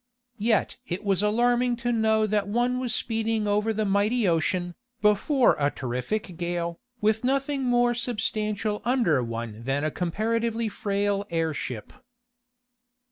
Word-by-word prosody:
Yet 215 -1 +1
it 180 +4 -4
was 195 -2 +2
alarming 240 +3 +2
to 240 - +2
know 220 -1 +2
that 210 -1 0
one 240 +4 +1
was 250 -2 -1
speeding 225 -1 0
over 210 +2 +1
the 215 0 -1
mighty 205 +3 +2
ocean, 175 +1 0 0.3
before 240 +6 +3
a 140 0 +3
terrific 140 - -4
gale, 170 -1 -3 0.2
with 215 +2 +2
nothing 275 +1 0
more 245 -1 +3
substantial 215 -3 -1
under 235 - +2
one 115 -1 -5
that 135 +2 0
a 155 - 0
comparatively 225 +6 -1
frail 200 0 -1
airship. 160 -9 -3
210 Hz, 135 wpm, -26 LUFS, 175-230 Hz, 0.3 s, before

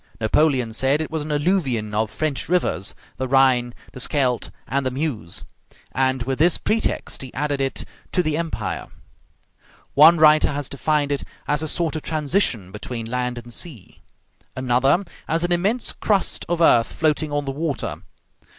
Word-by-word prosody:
Napoleon 125 0 +2
said 135 +5 +2
it 160 - -4
was 160 -1 -2
an 150 - -6
alluvion 145 - 0
of 110 0 0
French 155 +4 -2
rivers, 170 - 0 0.2
the 130 - -2
Rhine, 130 -2 +4 0.2
the - - -8
Scheldt, 125 -3 +1 0.2
and 140 +2 0
the 130 - 0
Meuse, 130 - -3 0.5
and 130 -1 +1
with 130 +2 -3
this 170 +2 +4
pretext 220 +1 -1
he 130 -2 -7
added 145 +1 -1
it 135 0 -2 0.3
to 180 - +2
the 155 -2 0
Empire. 155 - -3 1.1
One 160 +4 +8
writer 155 -2 +5
has 145 -2 -3
defined 145 +1 0
it 140 - -1 0.2
as 150 0 +1
a 155 - -2
sort 165 0 -1
of 155 - -3
transition 150 - 0
between 115 +3 -6
land 125 +1 -2
and 120 0 -8
sea. 135 - -7 0.5
Another, 130 +8 +2 0.2
as 165 +2 0
an 175 - 0
immense 200 +8 +1
crust 200 -3 0
of 170 -1 0
earth 115 -8 +5
floating 155 -1 0
on 145 0 -1
the 135 - -2
water. 145 +1 -3
140 Hz, 165 wpm, -22 LUFS, 125-160 Hz, 1.1 s, One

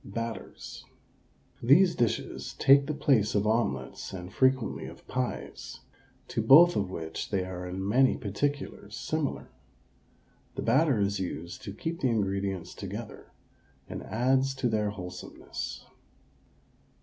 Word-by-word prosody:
BATTERS 115 +3 -6 0.8
These 170 +9 +6
dishes 120 -2 -1
take 140 +1 +6
the 155 - -1
place 130 -9 +2
of 105 0 +2
omelets 105 - -1
and 90 0 -7
frequently 130 -3 +2
of - - -12
pies, 125 -1 -4 0.5
to - - -1
both 155 +10 +8
of 100 -2 0
which 80 -3 -5
they 95 -3 0
are 90 -1 -6
in 95 +2 -4
many 130 +5 +4
particulars 110 -1 -3
similar. 155 +4 -2 1.0
The - - -3
batter 135 0 +3
is 100 0 +1
used 85 -2 -5
to 100 - -5
keep 165 +11 -4
the 130 - +3
ingredients 100 -4 -1
together, - - -7 0.6
and - - -6
adds 130 +4 +1
to 125 -2 0
their 105 -2 +1
wholesomeness. 90 -3 -7
110 Hz, 125 wpm, -29 LUFS, 95-135 Hz, 1.0 s, both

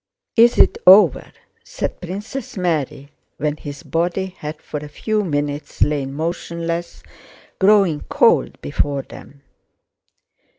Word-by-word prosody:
"Is 235 +1 +5
it - - +4
over?" 185 -5 +6 0.3
said - - -5
Princess 210 +8 -6
Mary 150 -5 -2 0.3
when 150 +1 -2
his 145 -2 -9
body 180 +3 -2
had 150 +1 -6
for 150 - -6
a 150 0 -9
few 215 +7 -1
minutes 145 -3 -2
lain 145 -2 -1
motionless, 170 +1 -4 0.6
growing 195 -6 +4
cold - - +3
before 135 - -1
them. 140 +2 -14
165 Hz, 115 wpm, -20 LUFS, 145-190 Hz, 0.6 s, over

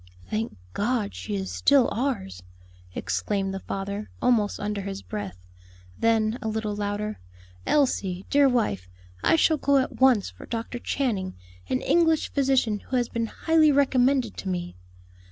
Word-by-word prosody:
"Thank 220 - -2 0.2
God! 215 -1 0
she 210 - -5
is 190 -1 -3
still 280 -3 +4
ours!" 220 - -2 0.5
exclaimed 195 -2 -1
the 195 - -3
father, 200 +2 -5
almost 225 -5 +2
under 205 0 -2
his 195 0 -6
breath; 200 - -6 0.5
then, 225 +1 +1
a 220 - -3
little 215 -1 -2
louder, 205 +1 -3 0.5
"Elsie, 195 -10 +1
dear 285 -1 +5
wife, 100 - 0 0.3
I - - +5
shall 320 -1 +3
go 280 0 +3
at 260 -1 -1
once 250 -7 +5
for - - -13
Dr. 230 +1 -4
Channing, 215 -9 -2 0.3
an 130 - 0
English 325 -2 +2
physician 260 -6 +2
who 260 - -5
has 245 -2 +1
been 230 -1 -2
highly 315 +4 +3
recommended 265 -3 +2
to 195 - -4
me." 175 -1 -3
220 Hz, 150 wpm, -26 LUFS, 200-265 Hz, 0.5 s, dear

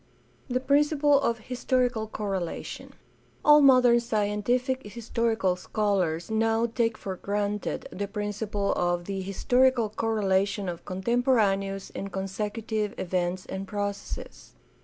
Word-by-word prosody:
The 255 0 +1
principle 290 +1 +3
of 235 -4 +1
historical 250 -1 -1
correlation. 195 -5 -4 0.3
— - - -27
All 300 0 +8
modern 255 -3 +6
scien 210 -3 -1
tific 250 0 -1
historical 230 -4 0
scholars 185 -3 -1
now 225 +1 +2
take 230 -1 0
for 190 -2 -5
granted 205 +1 -2
the 200 +1 -4
principle 205 0 -2
of 175 0 0
the 195 0 -3
historical 245 +5 +2
correlation 200 -3 0
of 170 -1 -5
contemporaneous 195 -2 +1
and 195 0 -5
consecu 205 +3 -4
tive 215 -2 -1
events 180 0 -1
and 190 +1 -5
processes. 205 0 -5
210 Hz, 120 wpm, -27 LUFS, 195-235 Hz, 0.3 s, All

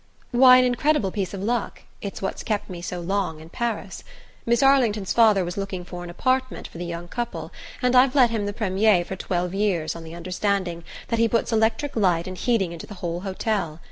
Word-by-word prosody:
"Why, 255 0 +8
an 255 - +4
incredible 250 -3 +1
piece 195 -2 -3
of 195 -1 -5
luck 235 0 -2 0.2
it's 200 -1 -6
what 190 - -3
kept 210 -3 -2
me 175 - -6
on - - -9
so 180 +1 -4
long 175 -2 -2
in 160 +1 -12
Paris. 215 -2 -4 0.4
Miss 235 +3 +3
Arlington's 235 -8 +3
father 215 -5 +5
was 175 +2 -5
looking 195 -2 -4
for 175 0 -7
an 175 - -8
apartment 255 +8 -1
for 170 - -11
the 175 - -4
young 170 0 -6
couple, 235 +5 -5 0.3
and 250 0 +3
I've 255 +1 +5
let 250 -4 +5
him 215 -3 -1
the - - -1
premier 200 -3 +2
for 190 - -5
twelve 180 -1 -2
years 195 -6 0
on 165 - -8
the 165 +1 -9
understanding 180 0 -2 0.3
that 230 - 0
he 230 - +4
puts 230 +1 0
electric 225 +6 +1
light 180 -6 +2
and 185 - -6
heating 195 -2 0
into 170 -1 -8
the 205 - -9
whole 175 -2 -4
hotel. 190 -4 -2
200 Hz, 215 wpm, -24 LUFS, 175-230 Hz, 0.4 s, Why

